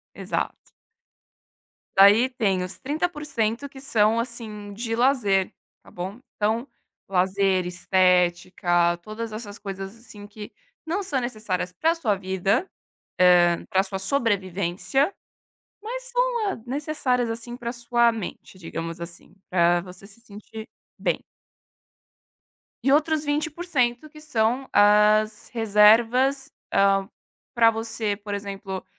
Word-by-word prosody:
Exato. - - -4 1.3
Daí 205 +6 +7
tem 200 -7 0
os 185 - -5
30% 285 -5 -2
que 270 -1 -13
são 225 -4 +2
assim, 220 -4 -6
de 225 +2 -3
lazer, 230 -7 +2 0.3
tá - - -17
bom, 190 +6 -6 0.2
então 220 +5 0 0.4
lazer, 190 0 +1
estética, 175 -1 +2
todas 215 +4 -7
essas 215 -2 -7
coisas 195 +1 -7
assim 210 -3 -11
que 210 0 -10 0.3
não 360 +6 -1
são 285 -8 -1
necessárias 215 -7 -3
pra 325 - +1
sua 260 -12 0
vida, 190 - 0 0.7
hã, 175 -1 +2
pra 190 - +2
sua 195 0 -5
sobrevivência, 200 - 0 0.7
mas - - -5
são, - - 0
hã, 300 - -4
necessárias 260 -3 -1
assim 235 +1 -6
pra 235 -1 -5
sua 235 -1 +2
mente, 200 -3 -8
digamos 165 -1 -6
assim, 170 +1 -9 0.2
pra 175 -1 +3
você 185 +2 -12
se 215 +3 -12
sentir 220 0 -11 0.3
bem. - - 0 1.7
Outros 305 +2 +3
20% 295 -3 -1
que 305 0 -14
são 250 -2 0
as 210 +1 +4
reservas, 235 +5 +4 0.2
hã, 195 0 +3 0.4
pra 230 -1 +5
você, 220 -2 -2
por 205 0 -6
exemplo, 195 -1 -6
215 Hz, 115 wpm, -24 LUFS, 195-255 Hz, 1.7 s, Daí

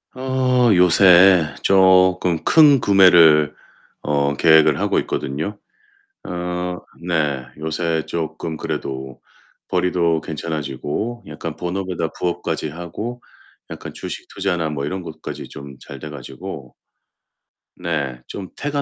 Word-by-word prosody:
어 130 -2 +2
요새 90 -2 +6
쪼끔 95 -3 +4
큰 150 -4 +6
구매를 85 -8 +5 0.5
어 70 -1 0
계획을 80 -2 +5
하고 - - +1
있거든요. 80 +10 -4 0.6
어 90 0 -4 0.3
네, 75 -6 0
요새 80 +1 -1
쪼끔 80 -1 -4
그래도 65 -3 -5 0.5
벌이도 85 -3 +1
괜찮아지고 80 - -4
약간 80 0 -6
본업에다 90 0 -3
부업까지 85 -3 -2
하고 90 +10 -7 0.5
약간 - - -8
주식 - - -7
투자나 90 -5 -1
뭐 70 -2 -3
이런 90 +5 -4
것까지 80 -2 -8
좀 70 -1 -10
잘 - - -11
돼 75 - -8
가지고 70 0 -9 1.1
네 70 -8 -3
좀 95 -2 -7
태가 145 0 -2
85 Hz, 225 characters per minute, -20 LUFS, 75-95 Hz, 1.1 s, 요새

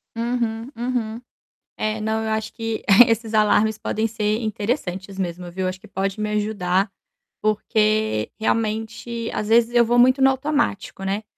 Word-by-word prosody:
Uhum, 230 0 -2
uhum. 235 -1 -3 0.6
É, 215 0 -2
não, 220 +1 -1
eu 220 - -2
acho 220 0 -2
que 225 -1 -4 0.2
esses 225 -1 -1
alarmes 215 0 +3
podem 220 +1 -1
ser 215 -1 -1
interessantes 200 -3 -3
mesmo, 180 -1 -4
viu. 185 +1 -2
Acho 185 +1 -4
que - - -15
pode 195 +2 -3
me 210 0 -1
ajudar, 200 -2 0 0.5
porque, 215 - +1
realmente, 225 +1 -2
às 210 - -2
vezes 235 +1 +4
eu 235 -1 +6
vou 240 +1 +3
muito 255 +2 +5
no 270 - +7
automático, 265 -8 -1
né. 200 +3 -2
220 Hz, 155 wpm, -22 LUFS, 205-230 Hz, 0.6 s, no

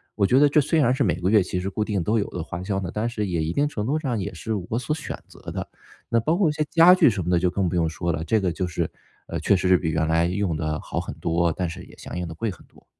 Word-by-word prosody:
我 100 - +2
觉 130 - +4
得 145 - +6
这 150 +1 +4
虽 160 +3 +1
然 125 -4 +4
是 130 - +1
每 90 - +1
个 90 +2 0
月 105 -2 +5
其 90 0 -3
实 95 +2 -3
固 105 +2 -1
定 100 -5 -1
都 110 +6 +1
有 100 - -1
的 90 - -4
花 85 +2 -6
销 95 0 -1
呢， 90 -3 -4
但 110 +3 -1
是 105 -3 -2
也 85 -4 -1
一 80 - -1
定 145 +7 +2
程 105 -8 -4
度 145 +6 0
上 130 -8 -2
也 100 +1 -4
是 110 +6 -4 0.2
我 115 - 0
所 150 +4 -2
选 160 - -6
择 - - -16
的。 - - -4 0.4
那 115 - +3
包 155 +9 +1
括 185 -5 +3
一 - - -1
些 155 - 0
家 175 +2 +7
具 185 - +6
什 100 -5 -2
么 85 - -3
的 90 - +4
就 90 +1 +2
更 95 +1 0
不 90 - -3
用 85 -2 +2
说 85 +2 -2
了， 80 - -3
这 110 +6 +2
个 90 -2 0
就 90 +2 -2
是， 85 - -2 0.4
呃， - - -3
确 100 - +3
实 95 0 0
是 90 0 +6
比 85 -2 -2
原 80 0 0
来 80 +1 +3
用 95 -1 -1
得 75 -1 -2
好 - - -4
很 - - -5
多， 85 +1 +1
但 90 +1 -2
是 85 - -8
也 - - -16
相 - - -7
应 90 -1 -3
地 80 - -7
贵 110 +5 -2
很 90 - -14
多。 - - -23
95 Hz, 350 characters per minute, -24 LUFS, 85-115 Hz, 0.4 s, 家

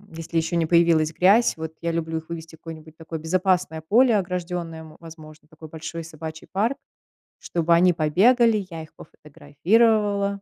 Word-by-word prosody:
если 165 0 -5
ещё 165 +1 -1
не 165 -1 +1
появилась 165 -2 +3
грязь. 205 +6 +3
Вот 160 0 -6
я 170 - -2
люблю 165 -1 -3
их 160 - -18
вывести 160 -1 -8
в - - -28
какое-нибудь 160 -1 -11
такое 160 -1 -7
безопасное 180 -1 0
поле 235 +8 +3
ограждённое, 175 -3 -4
м, 155 -1 -14
возможно, 155 -2 -14
такой 155 0 -14
большой 160 +1 -7
собачий 160 0 -9
парк, 225 +8 -1 0.6
чтобы 170 0 0
они 175 +1 +4
побегали. 210 +7 +3
Я 165 -2 -7
их 155 - -16
пофотографировала. 200 +7 0
165 Hz, 160 wpm, -23 LUFS, 160-185 Hz, 0.6 s, они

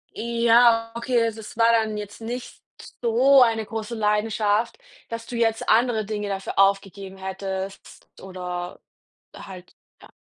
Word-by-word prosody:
Ja, 235 0 +3
okay. 235 0 +1
Also, 225 -1 -2
es 220 +1 -11
war 230 0 +5
dann 220 -2 +1
jetzt 210 +1 -8
nicht 240 +2 -7 0.4
so 255 +4 +5
eine 225 -2 +3
große 225 +2 -5
Leidenschaft, 210 +1 0 0.3
dass 230 0 -6
du 240 - -7
jetzt 225 -1 0
andere 225 -1 +2
Dinge 210 0 -4
dafür 195 0 -4
aufgegeben 195 -1 +1
hättest 190 0 -6
oder 180 -1 -6 0.6
halt 185 -2 -12 0.3
ja. - - -16
220 Hz, 135 wpm, -23 LUFS, 195-230 Hz, 0.6 s, war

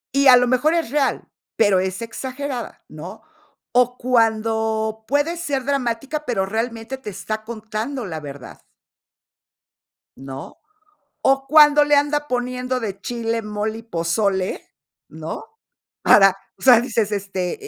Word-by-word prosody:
Y 280 0 +4
a 250 -1 +9
lo 245 0 +3
mejor 275 +6 +2
es 330 -8 -1
real, 285 -1 0 0.3
pero 205 -4 +4
es 190 +1 -3
exagerada, 255 +2 -6
¿no?, 175 - -10 0.5
o 250 0 +3
cuando 220 -2 0
puede 290 +6 +1
ser 285 -7 -3
dramática, 275 +2 -2
pero 205 -6 0
realmente 225 +4 -4
te 215 - -7
está 215 +3 -5
contando 225 +3 -5
la 160 -5 -5
verdad. 145 -3 -10 1.5
¿No?, 135 +1 -9 0.7
o 270 0 +3
cuando 295 0 +7
le 295 - +3
anda 295 +1 +1
poniendo 250 +1 -2
de 200 -4 -5
chile, 230 0 -2
mole 215 0 -3
y - - -10
pozole, 190 0 -1 0.4
¿no?, - - -7 0.6
para, 195 -2 +6 0.2
o - - -18
sea, 250 -3 +7
dices, 225 -4 -1
este, 195 -3 -2
230 Hz, 130 wpm, -21 LUFS, 210-265 Hz, 1.5 s, a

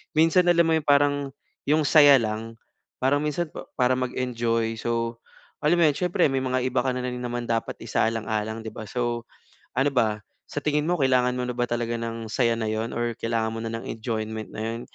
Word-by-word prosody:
minsan 165 +3 +4
alam 170 -1 +5
mo 165 - +2
'yong 160 -2 0
parang 145 0 +4 0.5
'yong 155 +1 +4
saya 145 -1 +7
lang. 115 0 -3 0.4
Parang 135 +3 +2
minsan 150 +2 -2 0.2
para 125 0 +3
mag-enjoy, 115 -3 -1
so 115 0 -2 0.4
alam 160 +4 +3
mo 170 - +5
'yon - - +1
siyempre 180 0 +2
may 135 -1 0
mga 130 -1 0
iba 130 0 +1
ka 130 - 0
na 125 0 -3
rin 125 0 -3
naman 120 0 -3
dapat 115 -1 -2
isaalang-alang 110 0 -1
'di 110 - -5
ba? 110 - -7
So 120 0 -2 0.5
ano 135 +2 +3
ba, 110 -4 +2 0.3
sa - - -3
tingin 150 +1 +1
mo 175 0 +1
kailangan 130 -2 +3
mo 125 - -1
na 125 - -3
ba 120 - -1
talaga 120 0 -2
ng 115 0 -5
saya 115 0 +2
na 110 - -2
'yon, 110 +2 -2
or 120 0 -1
kailangan 115 -1 -1
mo - - -4
na 115 - -3
ng 115 - -5
enjoyment 110 -1 -4
na - - -7
'yon? 115 +1 -3
120 Hz, 205 wpm, -25 LUFS, 115-140 Hz, 0.5 s, saya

